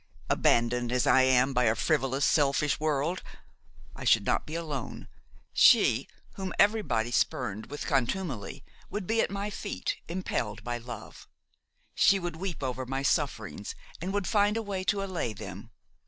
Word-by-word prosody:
Abandoned 120 +1 +2
as 125 0 +2
I 130 - +5
am 130 +1 +4
by 125 -1 +2
a 110 0 +3
frivolous, 135 0 +1
selfish 145 0 +2
world, 155 +3 0 0.7
I - - -8
should - - +4
not - - 0
be 155 - -5
alone; 150 -7 -5 0.5
she - - +5 0.3
whom 190 -1 -5
everybody 140 - +2
spurned 110 -4 -1
with 145 +1 -6
contumely 135 - -2 0.3
would 205 -2 -4
be 225 +4 +2
at - - 0
my 200 +1 -3
feet, 90 - -3
impelled 165 - -3
by 120 0 -3
love; 120 +1 -10 0.6
she 195 - +5
would 175 -3 -4
weep 180 -4 -4
over 130 0 -3
my 135 +1 -2
sufferings 455 - -1 0.3
and 190 - -3
would 200 -1 -1
find 205 +3 +2
a 225 - -2
way 195 -3 -3
to 200 +1 +1
allay 175 - -3
them. 100 +1 -9
140 Hz, 155 wpm, -29 LUFS, 125-190 Hz, 0.7 s, I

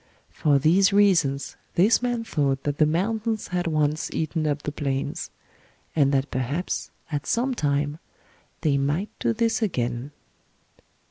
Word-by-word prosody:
For 145 -2 +2
these 180 +8 +4
reasons 170 -9 +2 0.2
this 210 +7 +4
man 245 -2 -1
thought 140 -10 0
that 145 -1 -2
the 155 - +5
mountains 215 +7 -1
had 180 -1 -1
once 155 -1 0
eaten 155 0 -1
up 145 0 -1
the 150 - -2
plains; 140 +3 -3 0.7
and 140 -3 +4
that 135 0 0
perhaps 135 +8 -2 0.2
at 145 -1 -3
some 255 +3 +1
time 145 - -1 0.6
they 145 -4 +2
might 150 +9 -1
do - - +1
this 230 +1 0
again." 125 - -1
155 Hz, 140 wpm, -25 LUFS, 140-200 Hz, 0.7 s, the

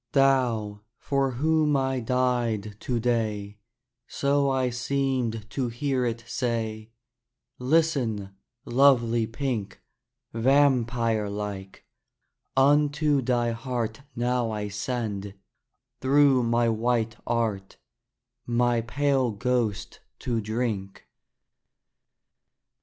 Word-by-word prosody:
"Thou, 120 -7 +2 0.2
for 135 -2 0
whom 150 +2 +2
I 130 -1 0
died 120 -4 0
to 120 -2 -2
day," 105 -3 -1 0.5
So 140 0 +1
I 130 -2 +1
seemed 125 -3 -1
to 130 -3 -1
hear 125 +2 -1
it 115 0 -4
say, 110 -3 -3 0.7
"Listen, 125 -8 +1 0.3
lovely 120 -3 +3
pink: 120 -4 -3 0.5
Vampire 115 -4 +2
like, 100 -2 -6 0.7
unto 145 +1 +3
thy 120 -1 +1
heart 120 -1 -3
Now 120 0 0
I 105 -1 -3
send, 105 -2 -4 0.6
through 135 -1 +4
my 120 0 +2
white 115 0 0
art, 110 -5 -1 0.7
My 120 0 +2
pale 135 +2 +1
ghost 110 -2 -2 0.2
to 115 -3 -1
drink." 110 -3 -3
120 Hz, 90 wpm, -26 LUFS, 110-135 Hz, 0.7 s, through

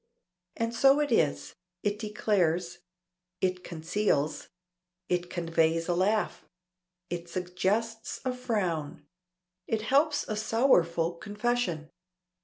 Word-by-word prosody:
And 230 0 -1
so 270 +4 +5
it 295 -3 0
is. 70 - +1 0.3
It 205 0 0
declares. 185 -6 0 0.6
It 185 -1 0
conceals. 160 -3 -1 0.6
It 180 0 0
conveys 165 -1 +1
a 175 - +2
laugh. 205 +5 +1 0.7
It 175 0 -4
suggests 190 +6 -1
a 255 - 0
frown. 185 - -2 0.6
It 220 -1 -1
helps 285 +6 +3
a 215 - -2
sorrowful 180 -7 +3
confession. 205 -4 -2
185 Hz, 100 wpm, -29 LUFS, 170-225 Hz, 0.7 s, so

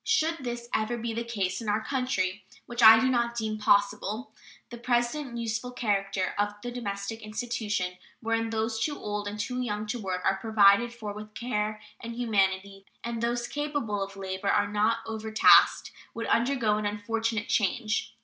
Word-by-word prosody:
Should 330 -8 +2
this 240 -2 -5
ever 220 +2 0
be 230 0 -3
the 230 +1 -2
case 200 -4 -2
in 220 - -3
our 215 +1 0
country, 205 -8 -1 0.2
which 240 0 -4
I 225 0 +10
do 260 - +2
not 235 -2 +1
deem 215 -1 -2
possible, 210 +2 +1 0.4
the 240 - -8
present 240 +2 -1
useful 230 +1 -3
character 195 -5 -1
of 205 0 0
the 245 - -4
domestic 225 -2 -4
institution, 215 -4 -3 0.2
wherein 225 0 -1
those 225 0 -1
too 295 -2 -2
old 210 -1 -4
and 205 +1 -5
too 250 +5 -2
young 210 -3 -2
to 220 +3 -3
work 185 -2 -3
are 195 - +2
provided 220 +2 +4
for 220 -4 -6
with 215 +1 -10
care 215 -3 -2 0.2
and 230 0 -7
humanity 195 -4 0 0.2
and 235 -1 -3
those 240 +1 -1
capable 290 -9 -2
of 195 0 -5
labor 190 0 -3
are 205 0 +2
not 215 +2 +1
overtasked, 220 -1 +4 0.2
would 230 - -3
undergo 235 -3 +2
an 210 -1 -1
unfortunate 225 +1 -2
change. 215 +1 0
220 Hz, 170 wpm, -28 LUFS, 205-235 Hz, 0.4 s, I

